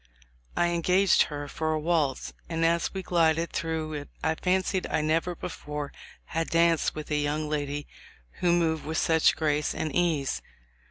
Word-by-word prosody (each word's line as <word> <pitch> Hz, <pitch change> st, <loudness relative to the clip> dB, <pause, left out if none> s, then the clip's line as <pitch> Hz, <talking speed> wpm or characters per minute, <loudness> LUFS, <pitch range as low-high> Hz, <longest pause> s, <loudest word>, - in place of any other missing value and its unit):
I 175 Hz, -, +3 dB
engaged 180 Hz, +3 st, +4 dB
her 145 Hz, -1 st, -5 dB
for 155 Hz, +2 st, -1 dB
a 155 Hz, -, 0 dB
waltz, 150 Hz, -4 st, 0 dB, 0.2 s
and 165 Hz, -1 st, 0 dB
as 170 Hz, 0 st, +2 dB
we 190 Hz, -1 st, -5 dB
glided 165 Hz, -1 st, +2 dB
through 160 Hz, -1 st, -2 dB
it 145 Hz, -1 st, -6 dB
I 160 Hz, -, +2 dB
fancied 185 Hz, +2 st, 0 dB
I -, -, 0 dB
never 165 Hz, +3 st, 0 dB
before 150 Hz, -2 st, -6 dB, 0.3 s
had 165 Hz, 0 st, -2 dB
danced 165 Hz, -1 st, +3 dB
with 155 Hz, 0 st, -6 dB
a 150 Hz, -, +2 dB
young 150 Hz, +1 st, -1 dB
lady 145 Hz, -1 st, -2 dB, 0.5 s
who 175 Hz, -, +3 dB
moved 165 Hz, -2 st, +2 dB
with 160 Hz, +1 st, -3 dB
such 160 Hz, -1 st, +4 dB
grace 150 Hz, -1 st, 0 dB
and 155 Hz, -3 st, -3 dB
ease. 160 Hz, -6 st, +1 dB
160 Hz, 165 wpm, -27 LUFS, 150-170 Hz, 0.5 s, engaged